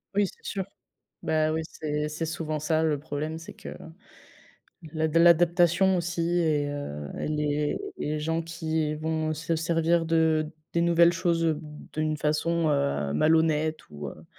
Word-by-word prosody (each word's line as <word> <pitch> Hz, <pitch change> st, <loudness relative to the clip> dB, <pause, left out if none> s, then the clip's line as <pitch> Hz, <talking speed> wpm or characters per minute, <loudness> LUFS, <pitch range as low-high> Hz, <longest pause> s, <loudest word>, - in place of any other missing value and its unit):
Oui, 205 Hz, -1 st, +3 dB
c'est -, -, -14 dB
sûr. 195 Hz, -2 st, -3 dB, 0.6 s
Bah 155 Hz, 0 st, +1 dB
ouais, 160 Hz, 0 st, -1 dB
c'est 150 Hz, -1 st, -3 dB
c'est 155 Hz, +2 st, -3 dB
souvent 155 Hz, -2 st, -3 dB
ça 155 Hz, +1 st, +1 dB
le 150 Hz, -2 st, +1 dB
problème. 155 Hz, +2 st, -4 dB
C'est 165 Hz, -, -10 dB
que -, -, -9 dB, 1.2 s
l'ad 160 Hz, 0 st, -1 dB
l'adaptation 175 Hz, +2 st, +5 dB
aussi 175 Hz, 0 st, -2 dB, 0.2 s
et 150 Hz, -3 st, +1 dB
heu 75 Hz, -, -5 dB
et -, -, -2 dB
les 150 Hz, -1 st, 0 dB, 0.2 s
et -, -, -3 dB
les 155 Hz, -, -1 dB
gens 160 Hz, +2 st, -1 dB
qui 160 Hz, -2 st, -2 dB
vont 155 Hz, 0 st, -1 dB
se 165 Hz, +2 st, -2 dB
servir 165 Hz, +1 st, +1 dB
de 160 Hz, -1 st, +2 dB, 0.3 s
des 170 Hz, -, +2 dB
nouvelles 170 Hz, 0 st, +5 dB
choses, 170 Hz, -2 st, +1 dB
heu, 160 Hz, -, +3 dB
b 155 Hz, -, -7 dB, 0.3 s
d'une 155 Hz, 0 st, -1 dB
façon, 160 Hz, +2 st, +1 dB
heu, 140 Hz, -, 0 dB
malhonnête 155 Hz, -, +2 dB
ou, 75 Hz, -1 st, -6 dB
heu -, -, -10 dB
160 Hz, 165 wpm, -27 LUFS, 150-165 Hz, 1.2 s, l'adaptation